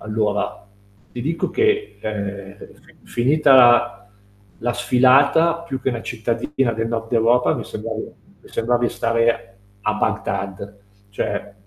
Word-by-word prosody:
Allora, 105 -1 -2 0.5
ti 120 - -6
dico 160 +3 -2
che, 420 0 0
ehm, 100 -2 -5 0.5
fi - - -22
finita 140 +3 +3
la 120 -1 +5 0.6
la 120 +1 -1
sfilata, 135 +7 +4
più 135 -1 -4
che 130 - +1
'na 115 - -4
cittadina 120 +3 -2
del 115 0 -2
nord 115 0 -4
Europa, 120 +2 +3
mi - - -4
sembrava 110 +1 -6 0.4
mi - - -18
sembrava 120 +1 0
di - - +2
stare 115 -4 -1 0.3
a 105 - +1
Bagdad, 100 -1 -3 0.3
cioè 100 0 -4
115 Hz, 135 wpm, -21 LUFS, 105-130 Hz, 0.6 s, la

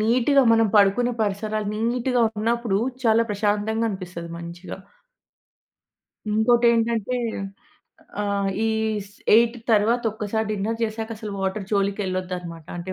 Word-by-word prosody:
నీట్‌గా 250 +5 +3
మనం 225 0 +4
పడుకునే 210 +5 +4
పరిసరాలు 210 +1 -2 0.2
నీట్‌గా 250 0 0 0.2
ఉన్నప్పుడు 230 -2 0 0.3
చాలా 230 0 +4
ప్రశాంతంగా 210 +2 0
అనిపిస్తది 180 -3 -7
మంచిగా. 170 +3 -8 1.5
ఇంకోటి 235 +3 +3
ఏంటంటే 230 +1 0 1.1
ఆహ్, 200 -1 0 0.2
ఈ - - +2 0.4
స్ 200 - -21 0.2
ఎయిట్ 235 +1 +4 0.2
తరువాత 225 +3 +3
ఒక్కసారి 220 0 -2
డిన్నర్ 215 +2 -2
జేసాక 220 0 -3
అసలు 215 -2 -6
వాటర్ 195 +1 -2
జోలికెళ్ళొద్దు 195 -2 -1
అన్నమాట. 170 -3 -10
అంటే 175 +2 -5
215 Hz, 115 wpm, -23 LUFS, 195-230 Hz, 1.5 s, మనం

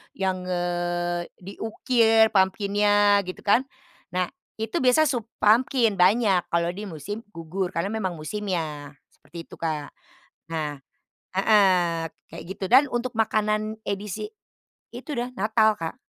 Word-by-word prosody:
yang, 190 -1 -1
eee, 175 -1 -1 0.2
diukir 220 +3 +2
pumpkin-nya 205 +1 +3
gitu 185 - -7
kan. 205 +5 +5 0.5
Nah 180 -1 0 0.3
itu 225 0 -2
biasa 260 +4 +4
sup 240 -5 -2 0.2
pumpkin, 225 -1 +3
banyak 190 -1 +3
kalau 170 0 +2
di 200 +4 -6
musim 180 +4 -6
gugur 175 +3 -4
karena 170 +4 -1
memang 205 -4 -2
musimnya, 155 -4 -4 0.2
seperti 165 +4 -11
itu, - - -10
Kak. 155 -3 -3 0.6
Nah 150 -3 -3 0.6
heeh, 185 -5 +3 0.3
kayak - - -8
gitu, 190 0 -5
dan 270 +3 +7
untuk 240 0 -2
makanan 215 -1 0
edisi, 200 - -4 0.6
itu 305 - -7
dah 240 +1 -2
Natal, 220 +1 +3
Kak. 165 -1 -4
195 Hz, 125 wpm, -25 LUFS, 175-220 Hz, 0.6 s, dan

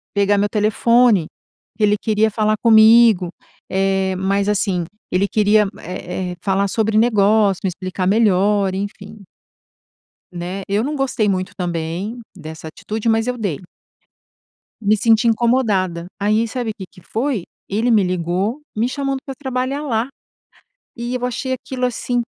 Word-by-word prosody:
pegar 200 0 +3
meu 205 - +2
telefone, 215 -1 +3 0.5
que 215 - -2
ele 210 0 +3
queria 220 +1 +1
falar 215 0 +1
comigo, 220 -4 +6 0.4
eh, 190 0 0
mas 195 +2 0
assim, 195 -4 0 0.3
ele 185 +3 +2
queria, 210 0 +3
eh 180 +1 -5
eh, - - -10
falar 195 +2 0
sobre 215 +2 0
negócio, 210 -3 +3
me - - +1
explicar 185 +1 -4
melhor, 200 -1 +2
enfim. 205 +1 -7 1.1
Né, 180 +2 -5
eu 205 +2 0
não 295 +4 -2
gostei 260 -6 0
muito 185 -1 -2
também, 175 +5 -4 0.2
dessa 160 -2 -9
atitude, 215 +7 -5
mas 225 +1 +1
eu 250 0 -2
dei. 190 -7 -3 1.2
Me 210 +1 +3
senti 225 +1 +3
incomodada. 215 -7 +1
Aí 215 +3 +1
sabe 240 -1 -3
o - - -9
que 190 - -7
que 180 - -17
foi? 230 -1 -2 0.3
Ele 220 +5 0
me 215 -3 +4
ligou 185 - -1
me 225 +3 +1
chamando 275 0 -2
para 270 - -5
trabalhar 265 +1 -3
lá, 235 -4 -1 0.9
e 240 +1 -4
eu 250 -1 -3
achei 260 +1 -2
aquilo, 255 0 -3
assim, 245 0 -2
210 Hz, 150 wpm, -19 LUFS, 190-235 Hz, 1.2 s, comigo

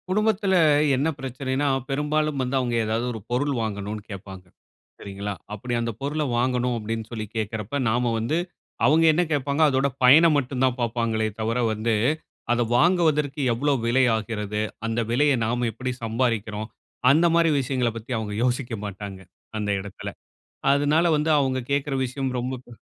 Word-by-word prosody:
குடும்பத்துல 205 0 +1 0.4
என்ன 140 +4 +1
பிரச்சனைன்னா, 130 +2 -2 0.2
பெரும்பாலும் 150 +1 0
வந்து 130 +1 -1
அவுங்க 120 -2 -1
எதாவது 110 +2 -1
ஒரு 110 - -6
பொருள் 140 +4 +1
வாங்கணும்ன்னு 105 -1 -4
கேட்பாங்க, 95 -1 -9 0.6
சரிங்களா, 100 +1 -5 0.2
அப்படி 120 +3 -5
அந்த 115 0 -1
பொருள 150 +2 -1
வாங்கணும் 125 0 +1
அப்படின்னு 110 0 -4
சொல்லி 110 -2 -4
கேட்கிறப்ப, 110 +4 -3
நாம 120 +1 +1
வந்து 120 +9 0 0.5
அவுங்க 160 +3 +5
என்ன 175 +3 +2
கேட்பாங்க, 140 +1 0
அதோட 135 0 +2 0.2
பயன 155 +7 +8
மட்டும் 130 -1 -1
தான் 130 -1 0
பார்ப்பாங்களே 115 -2 0
தவிர 115 +2 -1 0.2
வந்து, 110 +2 0 0.6
அத 120 0 +2 0.2
வாங்குவதற்கு 155 -3 +2
எவ்வளோ 145 +5 +1
விலை 125 +3 +3
ஆகிறது? 105 -1 -3 0.3
அந்த 115 +1 -1
விலைய 145 +4 +3
நாம 120 +1 0
எப்படி 125 +3 -3
சம்பாறிக்கிறோம். 110 -2 -1 0.4
அந்த 160 +5 +4
மாரி 170 -1 +4
விஷயங்கள 125 -2 0
பத்தி 115 +3 -9
அவுங்க 105 -2 -4
யோசிக்க 125 -1 -1
மாட்டாங்க, 100 -1 -7 0.4
அந்த 105 -1 -2
இடத்துல. 100 -1 -7 0.6
அதனால 145 +4 +2
வந்து 155 +2 +1
அவுங்க 130 -2 0
கேட்கிற 140 0 0
விஷயம் 130 +1 -3
ரொம்ப 125 +2 -3
ப 120 -2 -14
125 Hz, 150 wpm, -24 LUFS, 110-145 Hz, 0.6 s, பயன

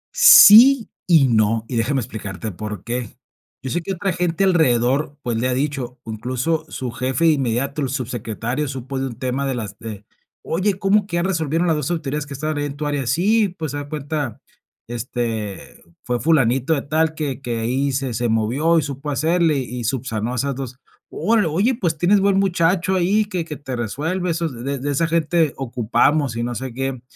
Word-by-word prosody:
Sí 275 - +9 0.2
y 160 -7 +5
no, 110 -1 +2
y 125 - -5
déjame 130 +4 +1
explicarte 105 -1 -6
por 105 0 -7
qué. 120 -2 -5 0.5
Yo 130 - -4
sé 175 - -1
que 190 +4 -4
otra 190 0 -2
gente 175 +1 0
alrededor, 145 -4 +2
pues, 120 -2 -1
le 125 - 0
ha 130 - 0
dicho, 135 -2 -3
incluso 125 +8 -2
su 125 -2 -5
jefe 130 +6 -1
inmediato, 135 +1 -1
el 135 - -1
subsecretario, 125 +1 -3
supo 135 0 -5
de 135 - -1
un 120 - -7
tema 130 +2 -2
de 135 - -1
las 110 -5 -6
de 105 -2 -8 0.4
oye, 190 +3 0
¿cómo 200 +1 +2
que 170 - -4
ya 170 - +1
resolvieron 165 -2 0
las 165 - +2
2 150 +2 -2
autoridades 150 -3 -3
que 140 - -7
estaban 155 +2 -3
ahí 145 - -1
en 140 - -5
tu 150 - -3
área? 145 -4 -2
Sí, 205 - +2
pues, 155 -3 -4
a 145 0 -5
cuenta 145 -4 -4 0.5
este, 115 -3 -4 0.2
fue 125 -1 -1
Fulanito 135 +1 +2
de 140 - -3
tal 160 +2 0
que 140 -4 -3
que 120 -3 -3
ahí 130 +5 0
se 130 -2 -2
se 120 +2 -1
movió 125 +10 +2
y 155 - +2
supo 140 +1 -5
hacerle 160 +2 +2
y 125 -2 -4
subsanó 120 -1 -2
esas 140 +3 -1
2. 130 -1 -6 0.3
Órale, 220 -3 +1
oye, 195 +11 +1
pues 170 -9 -1
tienes 190 +6 +3
buen 195 0 +2
muchacho 180 -1 +1
ahí, 195 +4 +2
que 180 -5 -3
que 155 - -6
te 135 -3 -6
resuelve 155 - -2
eso, 165 0 -1
de 125 -6 -8
de 140 +1 -2
de 145 +3 -2
esa 165 +4 +1
gente 165 -2 +1
ocupamos 130 +2 +1
y 115 - -2
no 120 0 -3
sé 130 +1 -5
qué. 135 0 -4
140 Hz, 195 wpm, -21 LUFS, 120-165 Hz, 0.5 s, Sí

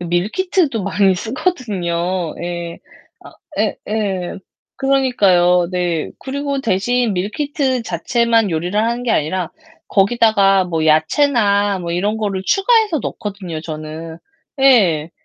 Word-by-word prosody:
밀키트도 220 - 0
많이 195 -1 +2
쓰거든요. 185 - -2
예. 175 -1 -5 0.5
아, - - -12 0.3
예예. 195 -4 -2 0.4
그러니까요. 195 -11 +3
네. 175 -3 -1
그리고 280 +1 -3
대신 235 +2 0
밀키트 260 - -1
자체만 225 +4 +1
요리를 175 +5 -1
하는게 235 +1 -1
아니라 170 +2 0 0.4
거기다가 200 -2 +3
뭐 165 -3 -1
야채나 200 - +2
뭐 170 -1 -5
이런 205 +5 0
거를 200 -3 -2
추가해서 415 - +3
넣거든요, 195 -9 -5
저는. 160 +1 -7 0.4
예. 180 - +4
200 Hz, 250 characters per minute, -18 LUFS, 175-245 Hz, 0.5 s, 예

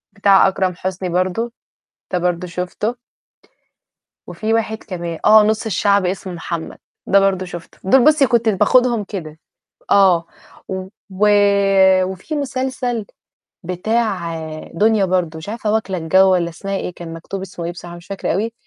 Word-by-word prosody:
بتاع 200 -1 +5
أكرم 190 -1 0
حسني 185 0 -4
برضو، 185 +7 -1 0.6
ده 180 - +1
برضو 180 0 -1
شُفته. 180 +6 -3 1.3
وفي 220 +1 -2
واحد 220 -1 0
كمان، 170 -4 -5
آه، 215 0 +8
نُص 220 +2 0
الشعب 200 -1 +2
اسمه 185 0 -4
محمد، 170 -1 -6 0.3
ده 200 +1 +5
برضو 195 -1 +1
شُفته. 175 -2 -10
دُول 250 +6 +5
بُصّي 305 -3 +5
كنت 235 -2 +2
باخدهم 235 +2 +3
كده. 160 -6 -7 0.5
آه. 185 -4 +5 0.4
و 190 +1 -6 0.8
وفي 190 - -5
مسلسل 255 -4 -2 0.6
بتاع 185 -1 -1 0.4
دنيا 210 +2 +3
برضو، 180 -3 -1
مش 160 - -8
عارفة 220 -1 -2
واكلة 215 -4 -1
الجو 190 +4 +4
والّا 175 -2 +1
اسمها 195 +4 -5
إيه، 180 - -4
كان 170 -1 -8
مكتوب 175 +4 -7
اسمه 180 -3 -7
إيه 170 - -3
بصراحة 175 0 -10
مش 175 - -14
فاكرة 195 -4 -3
أوي، 220 +5 -2
190 Hz, 145 wpm, -19 LUFS, 175-220 Hz, 1.3 s, آه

